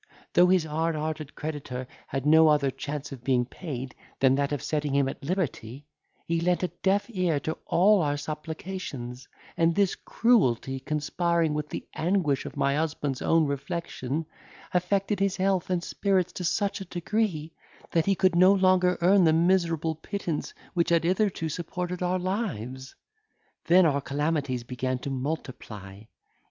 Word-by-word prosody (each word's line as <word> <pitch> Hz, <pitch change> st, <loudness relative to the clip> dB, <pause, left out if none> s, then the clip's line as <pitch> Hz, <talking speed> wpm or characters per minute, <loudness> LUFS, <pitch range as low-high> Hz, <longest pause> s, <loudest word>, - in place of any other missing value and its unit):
Though 175 Hz, +1 st, +6 dB
his 185 Hz, -2 st, +4 dB
hard 160 Hz, +1 st, -1 dB
hearted 155 Hz, -1 st, -4 dB
creditor 140 Hz, -5 st, -5 dB, 0.2 s
had 135 Hz, 0 st, -3 dB
no 160 Hz, +1 st, +7 dB
other 145 Hz, -3 st, +3 dB
chance 145 Hz, +2 st, -5 dB
of 130 Hz, -3 st, -9 dB
being 125 Hz, -2 st, +2 dB
paid, 130 Hz, -3 st, -6 dB, 0.3 s
than 130 Hz, 0 st, +5 dB
that 140 Hz, +1 st, 0 dB
of 145 Hz, -1 st, -2 dB
setting 150 Hz, -1 st, -1 dB
him 140 Hz, -1 st, +3 dB
at -, -, -6 dB
liberty, 140 Hz, -, -3 dB, 0.4 s
he 170 Hz, 0 st, 0 dB
lent 180 Hz, +1 st, +1 dB
a 180 Hz, -, +1 dB
deaf 195 Hz, +1 st, 0 dB
ear 180 Hz, -8 st, 0 dB
to 160 Hz, -, -4 dB
all 200 Hz, +3 st, +5 dB
our 145 Hz, -2 st, 0 dB
supplications; 150 Hz, -5 st, -6 dB, 0.3 s
and 165 Hz, 0 st, +2 dB
this 200 Hz, -2 st, +3 dB
cruelty 135 Hz, -, +1 dB
conspiring 160 Hz, +3 st, 0 dB
with 150 Hz, 0 st, -3 dB
the -, -, -6 dB
anguish 165 Hz, -5 st, 0 dB
of -, -, -9 dB
my 140 Hz, +1 st, +2 dB
husband's 150 Hz, -4 st, -2 dB
own 165 Hz, -1 st, +3 dB
reflection, 140 Hz, +1 st, -3 dB, 0.5 s
affected 195 Hz, +3 st, +1 dB
his 195 Hz, -1 st, +1 dB
health 190 Hz, -2 st, +1 dB
and 180 Hz, -2 st, 0 dB
spirits 190 Hz, -2 st, 0 dB
to 180 Hz, -, -5 dB
such 195 Hz, +3 st, 0 dB
a -, -, -5 dB
degree, 175 Hz, -3 st, -2 dB, 0.4 s
that 165 Hz, +1 st, +1 dB
he 195 Hz, -, +4 dB
could 185 Hz, -1 st, +3 dB
no 185 Hz, +2 st, +7 dB
longer 185 Hz, -2 st, +3 dB
earn 190 Hz, +2 st, +5 dB
the 160 Hz, -2 st, +5 dB
miserable 165 Hz, -2 st, +2 dB
pittance 165 Hz, 0 st, -4 dB, 0.2 s
which 170 Hz, -2 st, +1 dB
had 170 Hz, -1 st, +3 dB
hitherto 185 Hz, -1 st, +1 dB
supported 180 Hz, +3 st, -4 dB
our 180 Hz, +1 st, +1 dB
lives. 160 Hz, -, -4 dB, 0.7 s
Then 180 Hz, +1 st, +6 dB
our 140 Hz, -3 st, +2 dB
calamities 140 Hz, -3 st, -1 dB
began 130 Hz, +1 st, -2 dB
to 135 Hz, +2 st, -5 dB
multiply. 120 Hz, -8 st, -5 dB
160 Hz, 160 wpm, -27 LUFS, 140-180 Hz, 0.7 s, no